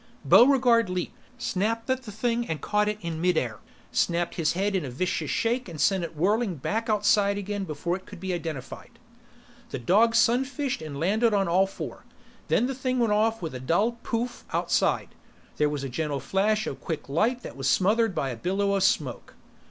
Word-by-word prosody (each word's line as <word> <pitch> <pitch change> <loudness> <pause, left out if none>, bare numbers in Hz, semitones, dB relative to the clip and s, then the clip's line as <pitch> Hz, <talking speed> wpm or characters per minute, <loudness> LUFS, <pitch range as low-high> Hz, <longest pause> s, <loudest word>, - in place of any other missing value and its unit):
Buregarde 245 -4 +5
leaped, 180 -1 -3 0.2
snapped 230 0 -1
at 260 0 0
the 220 - -9
thing 235 +3 -1
and 160 -2 -3
caught 210 0 +1
it 210 - -2
in 165 -2 -4
midair, 160 -11 0 0.3
snapped 170 0 0
his 160 -4 0
head 195 +3 0
in 185 - 0
a 135 - -5
vicious 155 +3 -2
shake 240 -1 0
and 160 -3 -8
sent 190 +5 +2
it 165 -1 -6
whirling 205 +3 +1
back 220 - -2
outside 205 -1 +3
again 205 0 -3
before 170 +2 -2
it 190 - -17
could 200 - -10
be 190 0 -3
identified. 165 - -6 0.7
The - - -4
dog 210 - +3
sunfished 260 - +1
and 145 -3 -6
landed 215 +6 +2
on 195 -1 +2
all 185 +3 +3
four. 195 - -7 0.4
Then 240 - +2
the 270 - -2
thing 255 0 -2
went 230 -4 +2
off 220 -1 +1
with 160 - -4
a 130 - -5
dull 200 - +1
pouf! 235 +2 -3
outside. - - +1 0.5
There 150 0 +2
was 145 -2 -3
a - - -2
gentle 145 +2 -2
flash 205 - +1
of - - -5
quick 160 -4 -4
light 225 - 0
that - - -8
was 135 -1 -1
smothered 210 - +2
by 135 -2 -1
a - - -5
billow 195 - 0
of 195 - +1
smoke. 195 +3 0
200 Hz, 195 wpm, -26 LUFS, 165-230 Hz, 0.7 s, Buregarde